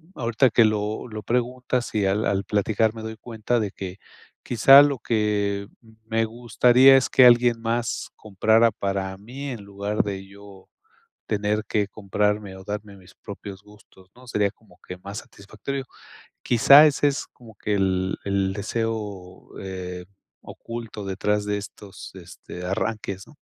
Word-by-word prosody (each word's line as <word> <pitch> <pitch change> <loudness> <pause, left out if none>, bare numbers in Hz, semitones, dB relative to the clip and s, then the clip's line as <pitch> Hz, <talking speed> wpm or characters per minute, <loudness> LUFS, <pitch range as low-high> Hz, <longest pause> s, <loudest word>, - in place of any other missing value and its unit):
ahorita 120 +1 +1
que 115 +1 +5
lo 105 +1 -2
lo 110 -2 -8
preguntas 125 +2 -2
y 105 -2 +1
al 100 +3 +1
al 100 0 0
platicar 110 +1 +1
me 115 - -8
doy 110 0 -7
cuenta 115 +1 -2
de 105 -3 -2
que 95 -1 -7 0.5
quizá 135 +4 +7
lo 145 -3 +1
que, 105 -3 -1
mm, 115 -2 -20 0.2
me 115 0 +1
gustaría 120 +3 +5
es 130 - 0
que 130 - +6
alguien 120 -1 +5
más 115 0 -2
comprara 110 +2 +2
para 95 -2 -3
mí, 130 +8 -8
en 120 -5 -6
lugar 100 +1 -2
de 100 -1 -5
yo 100 -1 -15 0.6
tener 105 0 -1
que 105 -2 0
comprarme, 105 0 -2
o 95 - -12
darme 105 0 -6
mis 90 -2 -18
propios 100 -1 -10
gustos, 105 -2 -20
¿no? 125 +1 -17
Sería 105 -4 0
como 105 -4 -24
que 90 - -7
más 100 +2 -8
satisfactorio. 110 +7 -7 0.6
Quizá 140 +5 +7
ese 145 0 +1
es, 140 - -4
como 115 -4 -17
que 105 +1 -2
el 95 -1 0
el 100 -1 0
deseo, 105 -3 -4
eh, 90 -2 -6 0.4
oculto 115 -3 -8
detrás 105 +2 -1
de 105 0 -1
estos, 100 -1 -10
este, 90 0 -10
arranques, 100 0 -3
¿no? 150 - -18
105 Hz, 155 wpm, -24 LUFS, 100-115 Hz, 0.6 s, quizá